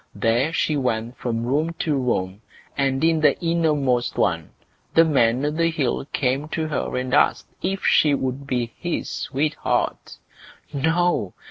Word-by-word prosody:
There 120 Hz, +7 st, +1 dB
she 155 Hz, -2 st, 0 dB
went 120 Hz, -3 st, -1 dB
from 115 Hz, -2 st, -2 dB
room 150 Hz, +6 st, 0 dB
to 155 Hz, -, 0 dB
room, 105 Hz, -7 st, -1 dB, 0.3 s
and 135 Hz, 0 st, 0 dB
in 165 Hz, -1 st, +3 dB
the 150 Hz, -3 st, +4 dB
innermost 150 Hz, -8 st, +1 dB
one 85 Hz, -5 st, 0 dB, 0.5 s
the 165 Hz, -, +7 dB
Man 130 Hz, -3 st, +2 dB
o' 150 Hz, -, +1 dB
the 165 Hz, +2 st, +1 dB
Hill 140 Hz, -6 st, -1 dB
came 135 Hz, +2 st, 0 dB
to 160 Hz, 0 st, -3 dB
her 150 Hz, -, -2 dB
and 130 Hz, 0 st, -3 dB
asked -, -, +3 dB, 0.2 s
if 195 Hz, +1 st, -2 dB
she 150 Hz, -2 st, +4 dB
would 135 Hz, +1 st, -3 dB
be 120 Hz, -3 st, -2 dB
his 175 Hz, -1 st, -3 dB
sweetheart? 150 Hz, +3 st, -2 dB, 0.6 s
No! 160 Hz, -, +1 dB
140 Hz, 150 wpm, -23 LUFS, 125-160 Hz, 0.6 s, the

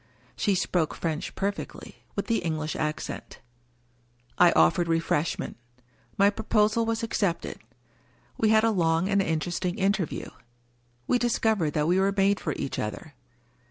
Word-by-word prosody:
(She 200 Hz, -3 st, +1 dB
spoke 180 Hz, -3 st, 0 dB
French 160 Hz, -2 st, -3 dB
perfectly 200 Hz, +1 st, -5 dB
— -, -, -35 dB
with -, -, -2 dB
the 230 Hz, -, +1 dB
English 155 Hz, -2 st, -2 dB
accent.) 155 Hz, 0 st, -4 dB, 1.0 s
I -, -, +7 dB
offered 85 Hz, -, +4 dB
refreshment; 165 Hz, -1 st, -1 dB, 0.6 s
my 200 Hz, +1 st, +5 dB
proposal 220 Hz, +1 st, +1 dB
was 230 Hz, 0 st, -1 dB
accepted. 200 Hz, -6 st, -1 dB, 0.8 s
We 220 Hz, -, +2 dB
had 220 Hz, 0 st, +5 dB
a 225 Hz, -, +4 dB
long 165 Hz, -2 st, +2 dB
and 200 Hz, -1 st, +3 dB
interesting 175 Hz, +2 st, -1 dB
interview 195 Hz, -4 st, -1 dB, 0.4 s
— 120 Hz, 0 st, -39 dB
^we 245 Hz, -, +3 dB
discovered 220 Hz, -9 st, +1 dB
that 150 Hz, 0 st, +1 dB
we 180 Hz, +2 st, +3 dB
were 195 Hz, +1 st, +2 dB
made 200 Hz, +1 st, +3 dB
for 155 Hz, -, -2 dB
each 135 Hz, -, -4 dB
other. 105 Hz, -1 st, -5 dB
180 Hz, 145 wpm, -27 LUFS, 155-210 Hz, 1.0 s, I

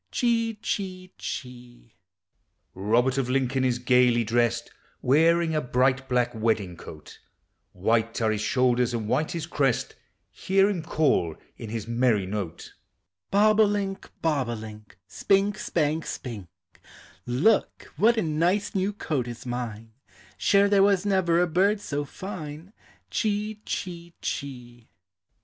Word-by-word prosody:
Chee, 230 Hz, -2 st, +1 dB
chee, 185 Hz, -2 st, -4 dB
chee. 120 Hz, -3 st, -8 dB, 0.8 s
Robert 120 Hz, +7 st, +1 dB
of 125 Hz, -2 st, -1 dB
Lincoln 130 Hz, 0 st, +1 dB
is 125 Hz, -2 st, +1 dB
gayly 125 Hz, -1 st, +3 dB
dressed, 120 Hz, +1 st, 0 dB, 0.3 s
Wearing 165 Hz, +5 st, +3 dB
a 155 Hz, -, +1 dB
bright 130 Hz, +1 st, +1 dB
black 125 Hz, -1 st, +1 dB
wedding 110 Hz, -5 st, -1 dB
coat; 75 Hz, -1 st, -12 dB, 0.5 s
White 110 Hz, +4 st, 0 dB
are 110 Hz, -2 st, +2 dB
his 105 Hz, -1 st, -2 dB
shoulders 125 Hz, 0 st, +2 dB
and 110 Hz, -2 st, -3 dB
white 155 Hz, +7 st, 0 dB
his 165 Hz, -2 st, -3 dB
crest, 135 Hz, -6 st, 0 dB, 0.4 s
Hear 195 Hz, +1 st, +2 dB
him 180 Hz, -5 st, -3 dB
call 145 Hz, -, +1 dB, 0.2 s
in 110 Hz, -, -8 dB
his 110 Hz, -1 st, -4 dB
merry 115 Hz, -4 st, +2 dB
note: 95 Hz, -4 st, -5 dB, 0.6 s
Bob 210 Hz, +2 st, +4 dB
o' -, -, +8 dB
link, 200 Hz, -2 st, -2 dB
bob 145 Hz, -6 st, +1 dB
o' 120 Hz, -, -2 dB
link, 105 Hz, -2 st, -11 dB
Spink, 195 Hz, -, +1 dB
spank, 155 Hz, 0 st, -1 dB
spink; 110 Hz, -8 st, -6 dB, 0.8 s
Look, 145 Hz, -, +1 dB
what 225 Hz, +9 st, +4 dB
a 220 Hz, -, +2 dB
nice 170 Hz, +6 st, 0 dB
new 195 Hz, +1 st, 0 dB
coat 145 Hz, -, -2 dB
is 120 Hz, +1 st, -8 dB
mine, 115 Hz, -3 st, -5 dB, 0.4 s
Sure 200 Hz, 0 st, +4 dB
there 200 Hz, -1 st, +4 dB
was 200 Hz, -1 st, +3 dB
never 185 Hz, -4 st, +2 dB
a 180 Hz, -, +4 dB
bird 190 Hz, +5 st, +2 dB
so 145 Hz, -6 st, -3 dB
fine. 165 Hz, 0 st, -8 dB, 0.4 s
Chee, 210 Hz, 0 st, -1 dB
chee, 170 Hz, -2 st, -5 dB
chee. 120 Hz, -4 st, -6 dB
135 Hz, 135 wpm, -26 LUFS, 120-185 Hz, 0.8 s, o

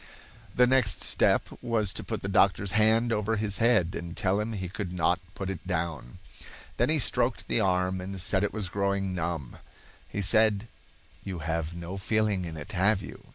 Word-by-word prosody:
The 125 Hz, -, +6 dB
next 125 Hz, -8 st, +2 dB
step -, -, +2 dB
was 110 Hz, -4 st, 0 dB
to -, -, -5 dB
put -, -, -5 dB
the -, -, -2 dB
doctor's 100 Hz, 0 st, +2 dB
hand 110 Hz, +3 st, +3 dB
over 105 Hz, +1 st, 0 dB
his 105 Hz, -2 st, -2 dB
head, 115 Hz, -7 st, +3 dB
and 85 Hz, +1 st, -6 dB
tell 100 Hz, +1 st, +1 dB
him 110 Hz, +2 st, -2 dB
he 95 Hz, -3 st, -4 dB
could 100 Hz, -1 st, -5 dB
not 90 Hz, 0 st, +1 dB, 0.2 s
put 95 Hz, -, -4 dB
it 95 Hz, -1 st, -8 dB
down. 80 Hz, -7 st, -3 dB, 0.6 s
Then 120 Hz, -, +2 dB
he 155 Hz, -, +4 dB
stroked 125 Hz, -2 st, 0 dB
the -, -, +1 dB
arm 90 Hz, -1 st, +1 dB
and 95 Hz, +1 st, -6 dB
said 95 Hz, +1 st, +2 dB
it 105 Hz, -, 0 dB
was 105 Hz, -4 st, -3 dB
growing 100 Hz, 0 st, -1 dB
numb. 85 Hz, -6 st, -4 dB, 0.5 s
He 100 Hz, -, -3 dB
said: 110 Hz, +1 st, +3 dB, 0.6 s
"You 95 Hz, -2 st, -5 dB
have 80 Hz, 0 st, -2 dB
no 85 Hz, +3 st, -6 dB
feeling 105 Hz, -2 st, 0 dB
in 80 Hz, -2 st, -6 dB
it, 75 Hz, -, -7 dB
have 95 Hz, +2 st, +2 dB
you?" -, -, -11 dB
100 Hz, 190 wpm, -28 LUFS, 90-110 Hz, 0.6 s, The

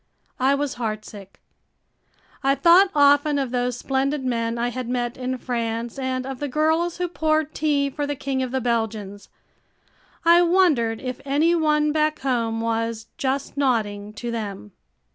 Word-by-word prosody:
I 265 Hz, +2 st, +3 dB
was 285 Hz, -2 st, -3 dB
heartsick. 215 Hz, -4 st, -6 dB, 1.0 s
I 275 Hz, 0 st, +3 dB
thought 345 Hz, +7 st, +6 dB
often 285 Hz, 0 st, +4 dB
of 270 Hz, -3 st, -2 dB
those 245 Hz, -1 st, -1 dB
splendid 270 Hz, +2 st, -1 dB
men 230 Hz, -2 st, -1 dB
I 240 Hz, +1 st, 0 dB
had 250 Hz, -1 st, -5 dB
met 245 Hz, -1 st, -2 dB
in 255 Hz, 0 st, -3 dB
France 235 Hz, 0 st, -3 dB
and 260 Hz, -1 st, -2 dB
of 265 Hz, -1 st, -6 dB
the 290 Hz, -, -2 dB
girls 320 Hz, +5 st, +1 dB
who 360 Hz, 0 st, -1 dB
poured 310 Hz, -2 st, 0 dB
tea 290 Hz, -2 st, +1 dB
for 290 Hz, +1 st, -3 dB
the 290 Hz, -, -2 dB
King 270 Hz, -1 st, -2 dB
of 255 Hz, -, -2 dB
the 260 Hz, +1 st, -2 dB
Belgians. 220 Hz, -4 st, -2 dB, 1.0 s
I 340 Hz, +1 st, +7 dB
wondered 330 Hz, -11 st, +3 dB
if 255 Hz, -1 st, -5 dB
any 295 Hz, +5 st, +2 dB
one 300 Hz, -2 st, +2 dB
back 310 Hz, 0 st, +1 dB
home 230 Hz, -4 st, -1 dB
was 230 Hz, 0 st, -2 dB
"just 270 Hz, +1 st, -2 dB
nodding" 210 Hz, -7 st, 0 dB
to 235 Hz, +2 st, -5 dB
them. 200 Hz, -, -5 dB
260 Hz, 160 wpm, -23 LUFS, 230-290 Hz, 1.0 s, I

